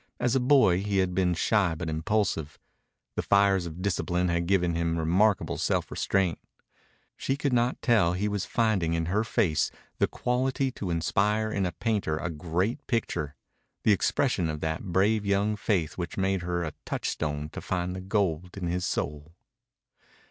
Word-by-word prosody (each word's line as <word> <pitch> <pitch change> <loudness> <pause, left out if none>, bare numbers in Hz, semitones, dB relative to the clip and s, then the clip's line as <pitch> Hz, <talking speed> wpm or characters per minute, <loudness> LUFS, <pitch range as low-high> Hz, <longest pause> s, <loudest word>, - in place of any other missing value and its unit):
As 125 +1 +1
a - - +4
boy 125 -9 +4
he 100 0 -1
had 95 -1 +1
been 90 -1 +2
shy 95 -1 +2
but 80 +1 -5
impulsive. 80 -1 -1 0.6
The - - -1
fires 100 -3 +3
of 85 +3 -7
discipline 90 -2 0
had 85 0 0
given 90 -3 +2
him 85 0 0
remarkable 95 +6 +2
self - - 0
restraint. 95 -4 0 0.8
She 135 - -2
could 140 -2 -1
not 120 +1 +1
tell 105 -9 +4
he 95 +3 -1
was 100 -2 -1
finding 100 -9 +1
in 80 0 0
her 105 +2 +2
face 95 -10 +1 0.3
the - - +4
quality 130 +2 0
to 100 -6 -5
inspire 105 +6 +1
in 95 -3 0
a - - -3
painter 105 -9 -1
a 85 +2 -3
great 85 +7 -2
picture, 85 - -1 0.5
the - - +4
expression 100 - +1
of 75 -1 -3
that 80 +4 -2
brave 105 +4 +3
young 100 +1 +1
faith 90 -7 -1
which 85 - -4
made 95 -1 +1
her 85 0 -2
a 80 -2 -4
touchstone 75 -1 -3
to - - -7
find 90 0 -2
the 95 - -5
gold 90 -3 -1
in 95 - -3
his 90 +1 -1
soul. 75 +3 -4
95 Hz, 170 wpm, -28 LUFS, 85-105 Hz, 0.8 s, a